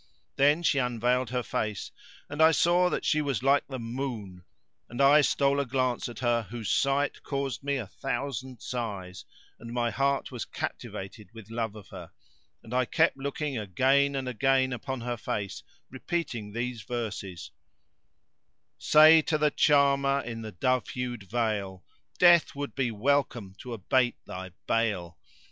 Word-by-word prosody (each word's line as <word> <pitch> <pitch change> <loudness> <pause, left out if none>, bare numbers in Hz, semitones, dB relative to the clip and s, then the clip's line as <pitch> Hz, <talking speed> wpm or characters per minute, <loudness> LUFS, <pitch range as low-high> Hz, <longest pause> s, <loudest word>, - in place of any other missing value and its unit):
Then 145 +5 +3
she 145 -4 +3
unveiled 125 0 0
her 125 0 -1
face, 105 -2 -3 0.4
and 145 +2 -3
I 160 +1 +7
saw 175 +2 +3
that - - -3
she 155 - +2
was 140 -6 -2
like 140 +1 +3
the 135 - -5
moon 115 -7 -5 0.4
and 120 - -8
I 140 +2 +7
stole 140 0 +2
a 140 - 0
glance 130 -1 -1
at 120 - -9
her 120 -1 +2
whose 115 -2 -4
sight 140 +1 +1
caused 135 -3 -3
me 140 0 0
a 120 - -4
thousand 130 0 -5
sighs, 100 -8 -5 0.3
and 115 0 -9
my 120 -1 0
heart 140 +7 0
was 125 -3 -4
captivated 100 +2 -6
with 110 -1 -11
love 115 -2 -3
of 105 -3 -12
her, - - -9 0.5
and 115 - -10
I 130 0 +2
kept - - +2
looking 140 -1 -3
again 135 +8 +2
and 135 -1 -3
again 130 +1 +2
upon 130 0 -5
her 120 0 -3
face 105 -2 -4 0.3
repeating 130 -6 -4
these 120 +1 -3
verses:— 95 -8 -5 1.3
"Say 155 +1 +7
to 155 0 0
the 150 -1 +2
charmer 140 -2 +3
in 115 -1 -6
the 110 -1 -7
dove 130 +7 0
hued 120 -6 -5
veil, 105 -5 -2 0.2
* - - -33
Death 175 -3 +5
would 145 0 -5
be 130 -3 0
welcome 120 -3 0
to 125 - -8
abate 120 +4 +1
thy 95 0 -7 0.2
bale! 95 -7 -1
125 Hz, 160 wpm, -28 LUFS, 110-140 Hz, 1.3 s, I